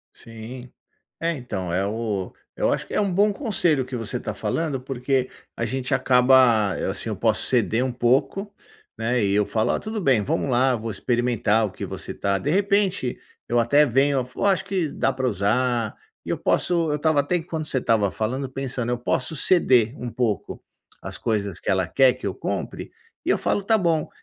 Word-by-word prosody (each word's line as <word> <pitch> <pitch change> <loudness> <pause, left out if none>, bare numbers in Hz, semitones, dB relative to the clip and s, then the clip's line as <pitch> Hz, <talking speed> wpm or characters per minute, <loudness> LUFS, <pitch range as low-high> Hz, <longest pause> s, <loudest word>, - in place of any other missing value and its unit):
Sim. 120 +3 -10 0.5
É, 165 +1 0
então 105 - -5
É 95 +2 +1
o 105 -3 -3 0.2
Eu - - +1
acho - - -3
que - - -9
é - - +2
um 200 -2 0
bom 205 +3 +4
conselho 175 - 0
que 130 0 -6
você 115 -3 -4
tá - - -4
falando 155 -5 -2
porque 130 0 -1 0.3
a 115 - -2
gente 130 +2 -2
acaba, 125 -5 +4 0.2
assim, - - -3
eu - - -2
posso - - +1
ceder 115 +3 +1
um 130 - -1
pouco 130 - +1 0.5
né 115 0 0
e 100 - +1
eu 105 0 +3
falo: 110 +3 0
"Olha, - - 0
tudo 215 0 -4
bem. 130 - +3
Vamos 135 - -1
lá, 125 +1 +3
vou 115 0 -5
experimentar 115 -2 +1
o 100 - -5
que - - -6
você - - -6
tá 100 -1 0
De 145 - -3
repente, 195 - +1 0.3
eu 120 - +3
até 145 +6 +4
venho 135 +1 +2
"Oh, - - -6
eu - - +2
acho 195 -1 +2
que 185 -5 -1
dá 135 - 0
para 130 0 -1
usar". 115 +2 0 0.3
Eu - - -2
posso 170 -3 +1
Eu 150 - 0
estava 155 0 +2
até 170 +5 -1
quando 160 -2 -5
você 140 - -1
estava 110 -5 +2
falando 130 +5 -2
pensando: 130 -3 -3
eu 125 - 0
posso 130 +5 -1
ceder 130 - +3
um 125 - -4
pouco 115 -5 -2 0.4
as - - -6
coisas 100 -5 -2
que - - -5
ela 95 -3 +2
quer 130 +2 +4
que 125 - -10
eu - - -2
compre - - -4 0.3
e - - -1
eu - - +4
falo 200 - 0
tá 220 +3 +3
bom. 165 -5 0
125 Hz, 200 wpm, -23 LUFS, 115-150 Hz, 0.5 s, bom